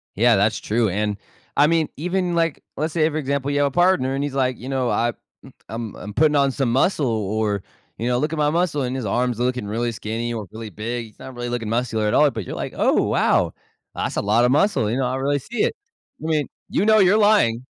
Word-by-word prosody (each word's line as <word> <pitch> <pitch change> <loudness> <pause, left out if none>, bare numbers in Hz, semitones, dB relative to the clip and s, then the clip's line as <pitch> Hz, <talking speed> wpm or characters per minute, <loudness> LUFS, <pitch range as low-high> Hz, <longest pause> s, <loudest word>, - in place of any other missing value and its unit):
Yeah, 115 +3 +4
that's 105 +3 +2
true. 110 0 0
And 105 +2 -1 0.4
I 145 +1 +5
mean, 165 -1 +1
even, 180 +2 -1
like, 165 -3 0
let's 155 +2 -2
say 160 -2 +2
for 155 - -4
example, 140 -1 -1
you 145 - 0
have 145 - +3
a - - -3
partner 175 -5 +3
and 135 +1 -1
he's 145 -2 -3
like, 130 -2 +1
you 130 - -7
know, 130 -2 0
“I 120 0 +1 0.6
I'm, 115 -2 -5
I'm 105 0 -8
putting 150 +2 +3
on 140 -1 +3
some 130 -3 -1
muscle” 145 +3 +2
or, 105 -2 -1 0.4
you 115 - -1
know, 125 0 +1
“look 150 +4 -1
at 160 - -3
my 150 -1 +2
muscle” 165 -3 0
and 125 0 -2
his 130 - -4
arms 120 +3 0
looking 125 -3 -1
really 115 +3 -1
skinny 115 +2 -4
or 110 -3 -5
really 110 -1 -7
big. 115 +4 -4
He's 110 - -20
not 130 - -9
really 120 0 -4
looking 120 -3 -3
muscular 115 -2 0
at 105 - +1
all, 150 -1 +5
but 110 -7 -5
you're, - - -5
like, - - -4
“Oh, - - +3
wow, - - +2 0.4
that's - - -3
a - - 0
lotta 115 +4 +3
muscle. 140 - +2
You 120 - -1
know, 130 - +1
I 130 +1 -1
really 140 +2 0
see 225 - -3
it.” - - 0 0.5
I - - -3
mean, 155 -3 +1 0.2
you - - +1
know, 220 0 +6
you're 190 +2 +5
lying. 205 - +3
125 Hz, 245 wpm, -22 LUFS, 115-150 Hz, 0.6 s, know